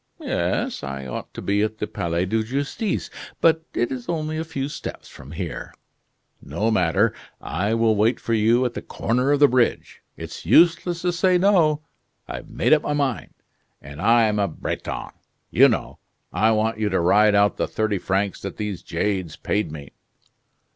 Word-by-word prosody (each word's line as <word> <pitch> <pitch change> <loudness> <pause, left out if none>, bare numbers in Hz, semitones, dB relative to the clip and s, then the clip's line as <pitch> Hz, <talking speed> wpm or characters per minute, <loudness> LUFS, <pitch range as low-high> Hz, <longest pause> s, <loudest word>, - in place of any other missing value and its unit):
"Yes, - - -2
I 70 0 -5
ought 65 - -6
to - - -6
be 100 +1 +1
at 110 0 -1
the - - -2
Palais 85 -2 -2
de 110 +4 0
Justice; 140 - -2 0.3
but 160 -1 +3
it 120 - 0
is 125 +1 -6
only 155 -2 -2
a - - -1
few 140 -4 -4
steps 150 - -7
from 70 +3 -12
here." - - -6 0.7
"No 100 +10 -1
matter. 95 +2 +2 0.3
I 100 +6 -1
will 115 -1 +3
wait 110 +4 +2
for 115 - -2
you 115 +3 +3
at 120 - -2
the - - -5
corner 125 +4 -1
of 145 - +3
the 145 - +7
bridge. 125 -2 0 0.2
It's - - -8
useless 170 +1 +4
to 180 - +2
say 180 +1 +3
'no'; 170 -6 +3 0.4
I've - - -7
made - - +2
up 155 - +4
my 150 - -2
mind, 140 -5 -2 0.4
and 70 +3 -10
I'm 115 -2 +4
a 100 - +2
Breton, 80 - -5 0.4
you - - +6
know. - - -3 0.3
I 110 - +3
want 110 0 +1
you 105 -1 +1
to 95 - +1
ride 105 +4 +4
out 100 0 +3
the - - 0
thirty 105 -3 -1
francs 95 +2 -1
that 95 - -6
those 105 -4 -4
jades 95 -1 -2
paid 105 -6 -2
me." 70 -2 -9
110 Hz, 180 wpm, -23 LUFS, 100-145 Hz, 0.7 s, the